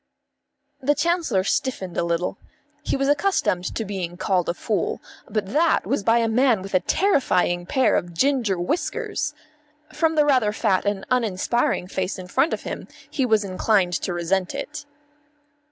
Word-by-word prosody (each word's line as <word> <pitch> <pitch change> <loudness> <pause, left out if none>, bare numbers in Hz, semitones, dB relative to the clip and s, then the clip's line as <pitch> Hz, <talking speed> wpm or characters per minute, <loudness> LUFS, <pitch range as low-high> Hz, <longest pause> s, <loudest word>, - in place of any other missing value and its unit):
The 290 +3 +2
Chancellor 330 - +1
stiffened 190 -4 -2
a - - +1
little. 170 +1 -1 0.4
He - - -1
was 275 0 0
accustomed 290 - +1
to 225 - -2
being 185 -3 -4
called 180 -2 0
a 170 - -1
fool; - - -1 0.3
but 210 -1 -2
that 320 +3 +3
was 275 - 0
by 225 +3 +3
a 230 -1 +2
man 230 -3 +3
with 195 - -9
a 185 - +5
terrifying 180 - +1
pair 260 +5 +3
of 175 - -1
ginger 235 0 +1
whiskers. 180 - -2 0.6
From 320 +1 +1
the 300 -1 +4
rather 255 -7 +3
fat 205 -4 +1
and 200 -1 -1
uninspiring 230 -3 +1
face 185 +1 -3
in 185 - -7
front 270 - +2
of - - -3
him - - -6 0.2
he 265 -4 0
was 220 -2 +3
inclined 190 -1 +1
to - - -2
resent 175 +2 -1
it. 295 -1 -6
210 Hz, 165 wpm, -23 LUFS, 185-275 Hz, 0.6 s, a